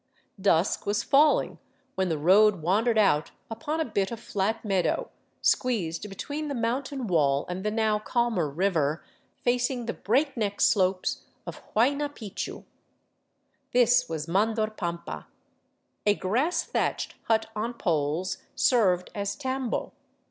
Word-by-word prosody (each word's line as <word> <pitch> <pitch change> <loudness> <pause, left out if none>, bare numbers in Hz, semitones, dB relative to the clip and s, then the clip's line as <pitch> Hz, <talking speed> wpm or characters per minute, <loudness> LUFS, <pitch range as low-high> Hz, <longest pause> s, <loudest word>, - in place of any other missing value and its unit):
Dusk 185 -1 +2
was 205 0 +1
falling 295 +2 +3 0.3
when 190 -1 0
the 160 - 0
road 190 +3 +4
wandered 220 +7 +2
out 175 -8 +3 0.2
upon 295 +8 -3
a 320 - +1
bit 200 -4 -1
of 235 - -6
flat 220 +1 -2
meadow, 190 -4 0 0.3
squeezed 210 -7 0
between 290 +10 -5
the 285 - -3
mountain 255 +3 -2
wall 145 -7 +2
and 180 +1 -4
the 210 - +1
now 215 -1 +1
calmer 225 - 0
river, 160 -2 0 0.4
facing 245 0 0
the 230 - -2
breakneck 230 -3 0
slopes 185 -2 +2 0.2
of - - -8
Huayna 280 +6 +2
Picchu. 210 -4 -6 1.1
This 245 0 +4
was 160 -1 -4
Mandor 215 +4 +1
pampa. 170 - -5 0.8
A 205 - +5
grass 250 - 0
thatched - - -2
hut 225 -1 +2
on 230 +3 -3
poles 165 -2 -1 0.2
served 185 -8 +2
as 200 -1 -3
tambo. 260 -3 -3
210 Hz, 130 wpm, -27 LUFS, 185-240 Hz, 1.1 s, A